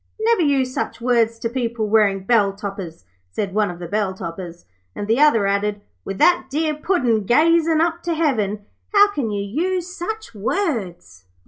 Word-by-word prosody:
'Never 450 Hz, -2 st, +2 dB
use 270 Hz, -4 st, +1 dB
such -, -, -3 dB
words 235 Hz, -2 st, +1 dB
to 230 Hz, -, -2 dB
people 235 Hz, -2 st, -2 dB
wearing 205 Hz, -3 st, +2 dB
bell 200 Hz, -2 st, +3 dB
toppers,' 195 Hz, -, -7 dB, 0.2 s
said 190 Hz, -, -4 dB
one 210 Hz, -1 st, +1 dB
of 175 Hz, -, -7 dB
the 175 Hz, -1 st, -7 dB
bell 205 Hz, 0 st, -1 dB
topperers, 175 Hz, -1 st, -8 dB, 0.3 s
and 205 Hz, -, -5 dB
the 225 Hz, +4 st, +2 dB
other 290 Hz, -9 st, +4 dB
added, 205 Hz, +1 st, 0 dB, 0.2 s
'With 195 Hz, -, -5 dB
that 350 Hz, -, +3 dB
dear 305 Hz, +2 st, 0 dB
Puddin' 265 Hz, -, 0 dB
gazing 325 Hz, -, +3 dB
up 335 Hz, +1 st, 0 dB
to 340 Hz, -1 st, 0 dB
heaven, 215 Hz, -10 st, 0 dB, 0.3 s
how 410 Hz, 0 st, +6 dB
can 275 Hz, -, -2 dB
you 205 Hz, -1 st, -2 dB
use 355 Hz, -, -2 dB
such 440 Hz, -, -5 dB
words?' 195 Hz, -, -3 dB
230 Hz, 175 wpm, -21 LUFS, 200-315 Hz, 0.3 s, how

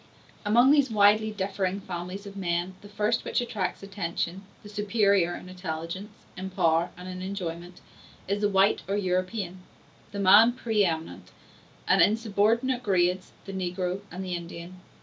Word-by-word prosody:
Amongst 240 Hz, +6 st, +5 dB
these 285 Hz, -3 st, +4 dB
widely 215 Hz, 0 st, +4 dB
differing 195 Hz, -2 st, -2 dB
families 180 Hz, +2 st, -6 dB
of 200 Hz, -1 st, -9 dB
men, 175 Hz, -1 st, -1 dB
the 205 Hz, -, -13 dB
first 210 Hz, +3 st, 0 dB
which -, -, 0 dB
attracts 210 Hz, -6 st, -3 dB
attention, 185 Hz, -2 st, -3 dB, 0.2 s
the -, -, -10 dB
superior 200 Hz, -4 st, +2 dB
in -, -, -10 dB
intelligence, 185 Hz, +3 st, -6 dB
in 190 Hz, +1 st, -5 dB
power 165 Hz, -2 st, +2 dB
and 180 Hz, +1 st, -9 dB
in 185 Hz, 0 st, -6 dB
enjoyment, 180 Hz, -2 st, -6 dB, 0.5 s
is 200 Hz, +2 st, -1 dB
the 205 Hz, -, +3 dB
white 195 Hz, +1 st, +3 dB
or 200 Hz, +1 st, 0 dB
European, 185 Hz, 0 st, -2 dB, 0.5 s
the 200 Hz, -, -5 dB
man 205 Hz, +5 st, +7 dB
pre 225 Hz, -4 st, +1 dB
eminent; 165 Hz, -3 st, -3 dB, 0.6 s
and -, -, +5 dB
in 215 Hz, -, +5 dB
subordinate 230 Hz, +4 st, +1 dB
grades, 185 Hz, -3 st, +1 dB
the 195 Hz, -, -7 dB
negro 185 Hz, 0 st, -2 dB
and 185 Hz, +3 st, -5 dB
the 180 Hz, -, -3 dB
Indian. 170 Hz, +1 st, -7 dB
190 Hz, 155 wpm, -27 LUFS, 180-210 Hz, 0.6 s, man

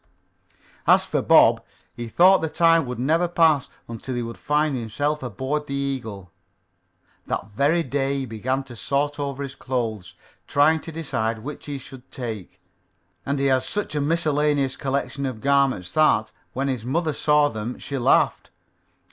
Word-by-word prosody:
As -, -, +5 dB
for -, -, -1 dB
Bob, -, -, +5 dB, 0.3 s
he 120 Hz, -1 st, -6 dB
thought 185 Hz, -, +5 dB
the 160 Hz, -, -1 dB
time 165 Hz, -3 st, +3 dB
would 125 Hz, -1 st, -4 dB
never 160 Hz, +8 st, +2 dB
pass 160 Hz, -5 st, +3 dB, 0.2 s
until 115 Hz, +3 st, -6 dB
he 120 Hz, -, -2 dB
would 115 Hz, 0 st, -6 dB
find 150 Hz, 0 st, +1 dB
himself 145 Hz, +6 st, -2 dB
aboard 130 Hz, +5 st, -3 dB
the 140 Hz, -, -3 dB
Eagle. 115 Hz, -10 st, -4 dB, 1.0 s
That 100 Hz, -, -3 dB
very 145 Hz, +10 st, +2 dB
day 135 Hz, 0 st, -1 dB
he 135 Hz, -, -2 dB
began 130 Hz, +4 st, -2 dB
to 130 Hz, -3 st, -11 dB
sort 145 Hz, +5 st, -1 dB
over 140 Hz, -1 st, -3 dB
his 135 Hz, -2 st, -6 dB
clothes, 110 Hz, -10 st, -4 dB, 0.3 s
trying 155 Hz, +3 st, +4 dB
to 165 Hz, -, -9 dB
decide 115 Hz, -9 st, -3 dB
which 150 Hz, +2 st, -8 dB
he 145 Hz, -1 st, -4 dB
should 130 Hz, -1 st, -13 dB
take, 115 Hz, -8 st, -6 dB, 0.7 s
and 140 Hz, +1 st, 0 dB
he 140 Hz, -, 0 dB
had 130 Hz, -1 st, +3 dB
such 205 Hz, +4 st, -3 dB
a 150 Hz, -, 0 dB
miscellaneous 150 Hz, -3 st, +1 dB
collection 140 Hz, 0 st, -2 dB
of 125 Hz, -4 st, -5 dB
garments 135 Hz, -9 st, +1 dB
that, 110 Hz, -9 st, +3 dB, 0.2 s
when 135 Hz, +2 st, -1 dB
his 130 Hz, -5 st, -2 dB
mother 155 Hz, +5 st, -1 dB
saw 150 Hz, 0 st, +3 dB
them, 110 Hz, +1 st, -5 dB
she 140 Hz, -1 st, -5 dB
laughed. 120 Hz, -, +2 dB
140 Hz, 165 wpm, -23 LUFS, 120-150 Hz, 1.0 s, As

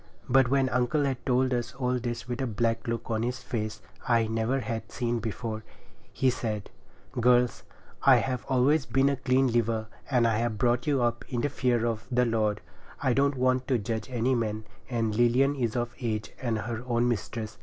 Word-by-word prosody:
But 135 Hz, 0 st, +5 dB
when 135 Hz, +1 st, +2 dB
uncle 125 Hz, +5 st, +1 dB
had 135 Hz, -3 st, -2 dB
told 130 Hz, 0 st, +2 dB
us 120 Hz, +2 st, -2 dB
all 125 Hz, -1 st, 0 dB
this 120 Hz, 0 st, -4 dB
with 120 Hz, +1 st, -3 dB
a 130 Hz, -, 0 dB
black 115 Hz, +1 st, -1 dB
look 115 Hz, 0 st, -3 dB
on 110 Hz, -1 st, 0 dB
his 125 Hz, +2 st, -1 dB
face 110 Hz, -3 st, -3 dB, 0.3 s
I 115 Hz, -2 st, +3 dB
never 115 Hz, +4 st, 0 dB
had 115 Hz, 0 st, -5 dB
seen 120 Hz, -1 st, -1 dB
before, 110 Hz, 0 st, -4 dB, 0.5 s
he 130 Hz, -1 st, +2 dB
said— 110 Hz, -5 st, -4 dB, 0.4 s
'Girls, 125 Hz, -1 st, +3 dB, 0.4 s
I -, -, +7 dB
have 130 Hz, -2 st, 0 dB
always 135 Hz, +3 st, +3 dB
been 135 Hz, +3 st, +3 dB
a 140 Hz, -, +1 dB
clean 130 Hz, 0 st, +2 dB
liver, 115 Hz, -1 st, +1 dB, 0.2 s
and 125 Hz, -4 st, +3 dB
I 115 Hz, -1 st, +1 dB
have 115 Hz, -2 st, -1 dB
brought 120 Hz, +3 st, +1 dB
you 140 Hz, -4 st, +2 dB
up 120 Hz, 0 st, 0 dB
in 120 Hz, -2 st, -1 dB
the 145 Hz, -, +1 dB
fear 125 Hz, -4 st, +1 dB
of 115 Hz, -1 st, -2 dB
the 125 Hz, -1 st, +2 dB
Lord. 110 Hz, -3 st, 0 dB, 0.4 s
I 130 Hz, -3 st, +2 dB
don't 140 Hz, +2 st, +2 dB
want 130 Hz, 0 st, +1 dB
to 130 Hz, -, +2 dB
judge 110 Hz, +2 st, -3 dB
any 125 Hz, +1 st, +1 dB
man, 110 Hz, -3 st, -1 dB, 0.3 s
and 115 Hz, -3 st, 0 dB
Lilian 120 Hz, +4 st, +4 dB
is 120 Hz, -5 st, -2 dB
of 120 Hz, 0 st, -1 dB
age 110 Hz, -4 st, -3 dB
and 120 Hz, -4 st, 0 dB
her 115 Hz, +2 st, -4 dB
own 120 Hz, 0 st, +2 dB
mistress. 110 Hz, -1 st, -3 dB
120 Hz, 195 wpm, -28 LUFS, 115-130 Hz, 0.5 s, I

